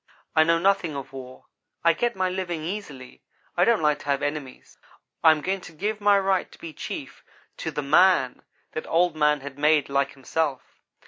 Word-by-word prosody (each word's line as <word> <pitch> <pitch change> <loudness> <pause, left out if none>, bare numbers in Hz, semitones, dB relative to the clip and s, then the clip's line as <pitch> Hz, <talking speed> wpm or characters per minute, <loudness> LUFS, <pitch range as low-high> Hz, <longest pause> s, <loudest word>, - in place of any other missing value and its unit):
I 160 - +6
know 165 +1 +3
nothing 175 -3 +1
of 135 -1 -7
war. 130 -1 -10 0.4
I 170 0 +5
get 240 +7 -1
my 185 -1 0
living 180 -3 -3
easily. 155 -9 -7 0.3
I 175 - +4
don't 230 -6 +2
like 150 -1 +2
to - - -13
have 140 -1 0
enemies. 145 -3 -5 0.4
I 160 - +8
am 155 -1 +3
going 190 +4 -2
to 165 - -11
give 210 +6 -3
my 205 0 +5
right 195 -1 0
to - - -15
be 165 -2 -9
chief - - -7 0.3
to - - -4
the 150 - -4
man 145 -2 +4 0.3
that 155 - -5
Old 170 0 +2
man 150 -1 +2
has 140 0 -9
made 150 -1 +3
like 140 0 0
himself.' 140 +1 -3
155 Hz, 195 wpm, -25 LUFS, 140-185 Hz, 0.4 s, I